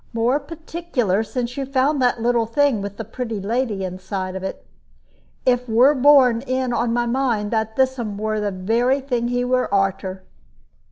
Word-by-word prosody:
More 235 Hz, +5 st, +1 dB
particular 310 Hz, -, -2 dB
since 245 Hz, +2 st, -4 dB
you 275 Hz, -, -2 dB
found 275 Hz, +1 st, +1 dB
that 245 Hz, -1 st, +2 dB
little 235 Hz, -1 st, +1 dB
thing, 260 Hz, -2 st, +2 dB
with 200 Hz, 0 st, -6 dB
the 225 Hz, -, -5 dB
pretty 225 Hz, -1 st, -5 dB
lady 215 Hz, 0 st, -1 dB
inside 185 Hz, 0 st, -4 dB
of 190 Hz, -, -4 dB
it. 190 Hz, -, -6 dB, 0.8 s
It 250 Hz, -1 st, +1 dB
were 245 Hz, +6 st, +5 dB
borne 260 Hz, -4 st, +5 dB
in 255 Hz, -1 st, -1 dB
on 235 Hz, 0 st, 0 dB
my 240 Hz, 0 st, +1 dB
mind 235 Hz, -4 st, 0 dB
that 220 Hz, -1 st, -1 dB
thissom 255 Hz, -6 st, 0 dB
were 215 Hz, 0 st, -1 dB
the 210 Hz, -1 st, -1 dB
very 230 Hz, +8 st, +1 dB
thing 245 Hz, -3 st, -2 dB
he 245 Hz, 0 st, 0 dB
were 255 Hz, -2 st, 0 dB
arter." 195 Hz, -1 st, -1 dB
240 Hz, 170 wpm, -21 LUFS, 210-260 Hz, 0.8 s, were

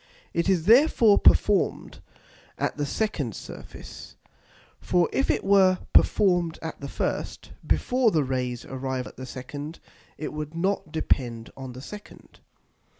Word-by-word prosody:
It 170 Hz, +3 st, 0 dB
is 175 Hz, -4 st, +2 dB
therefore 230 Hz, -, +6 dB
perform'd 205 Hz, -2 st, +2 dB, 0.6 s
at -, -, -1 dB
the 145 Hz, -1 st, -2 dB
second 145 Hz, -, -2 dB
Surface; -, -, -10 dB, 0.6 s
for 175 Hz, -2 st, +2 dB
if 270 Hz, -, +1 dB
it -, -, +1 dB
were 190 Hz, -2 st, +5 dB, 0.2 s
perform'd 175 Hz, -5 st, +3 dB
at 160 Hz, -, -6 dB
the 140 Hz, -, -5 dB
first, -, -, -4 dB, 0.2 s
before 250 Hz, -2 st, +2 dB
the 160 Hz, -7 st, +1 dB
Rays 125 Hz, -2 st, -3 dB
arrive 130 Hz, -1 st, -4 dB
at -, -, -12 dB
the 130 Hz, 0 st, -7 dB
second, 145 Hz, +5 st, -7 dB, 0.4 s
it 155 Hz, -, -5 dB
would 150 Hz, +1 st, -6 dB
not 185 Hz, -2 st, -1 dB
depend 120 Hz, -7 st, -1 dB
on 130 Hz, -2 st, -8 dB
the 130 Hz, -, -9 dB
second. 210 Hz, +5 st, -12 dB
160 Hz, 140 wpm, -26 LUFS, 130-195 Hz, 0.6 s, therefore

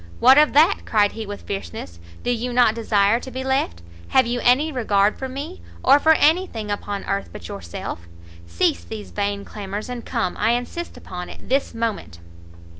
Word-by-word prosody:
"What 260 Hz, +4 st, +7 dB
of 300 Hz, -, +4 dB
that?" 320 Hz, +7 st, +5 dB
cried 205 Hz, -2 st, +2 dB
he 220 Hz, -2 st, -7 dB
with 205 Hz, 0 st, -7 dB
fierceness, 90 Hz, -, -6 dB, 0.2 s
"do 245 Hz, -, 0 dB
you 245 Hz, +1 st, -2 dB
not 240 Hz, -3 st, +5 dB
desire 220 Hz, -1 st, +2 dB
to 260 Hz, -, -8 dB
be 260 Hz, +1 st, -5 dB
left? 265 Hz, -, -1 dB, 0.2 s
have 260 Hz, -1 st, +4 dB
you 240 Hz, +1 st, -1 dB
any 280 Hz, +6 st, +3 dB
regard 210 Hz, -6 st, +1 dB
for 265 Hz, -, -4 dB
me? 290 Hz, +8 st, -7 dB, 0.2 s
or 275 Hz, +2 st, +6 dB
for 320 Hz, +2 st, +5 dB
any 325 Hz, +5 st, +3 dB
thing 215 Hz, -6 st, -5 dB
upon 205 Hz, -1 st, -3 dB
earth 200 Hz, 0 st, -2 dB
but 210 Hz, -, -9 dB
yourself! 195 Hz, -, -7 dB, 0.4 s
cease 85 Hz, 0 st, 0 dB
these 95 Hz, +2 st, -8 dB
vain 200 Hz, -, -2 dB
clamours, 205 Hz, +2 st, -6 dB
and 245 Hz, -2 st, -5 dB
come, 230 Hz, -7 st, -2 dB
I 225 Hz, +2 st, +2 dB
insist 245 Hz, +8 st, -4 dB
upon 180 Hz, -1 st, -7 dB
it, -, -, -12 dB
this 270 Hz, -2 st, 0 dB
moment." 225 Hz, -, -3 dB
225 Hz, 190 wpm, -22 LUFS, 200-260 Hz, 0.4 s, What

